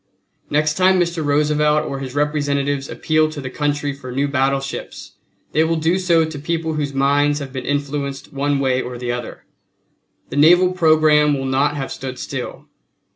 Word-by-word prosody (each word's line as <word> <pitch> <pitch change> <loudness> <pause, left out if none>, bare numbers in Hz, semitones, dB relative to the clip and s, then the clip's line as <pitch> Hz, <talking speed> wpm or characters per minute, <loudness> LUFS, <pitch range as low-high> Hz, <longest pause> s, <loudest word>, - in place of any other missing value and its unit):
Next 150 +1 +1
time 185 0 +4
Mr. 170 -2 0
Roosevelt 150 +1 +2
or 135 - -4
his 135 -1 -7
representatives 145 -2 0
appeal 155 0 +1
to 155 -1 -7
the 130 -2 -6
country 145 0 -1
for 130 -2 -9
new 140 +3 0
battleships 135 0 -2 0.4
they 155 - +3
will 165 +1 +1
do 165 +3 +1
so 170 -3 +3
to 155 -2 -7
people 160 +1 -2
whose 145 -2 -2
minds 145 +2 +2
have 140 -3 -7
been 130 - -5
influenced 140 -1 -3
one 140 0 0
way 130 -1 +1
or 125 0 -6
the 120 0 -3
other. 120 -1 -6 0.8
The 140 - -5
naval 175 +5 +6
programme 155 -4 +4
will 135 - -4
not 135 +3 +1
have 135 -1 -4
stood 130 -1 -6
still. 125 -1 -6
145 Hz, 175 wpm, -20 LUFS, 135-155 Hz, 0.8 s, naval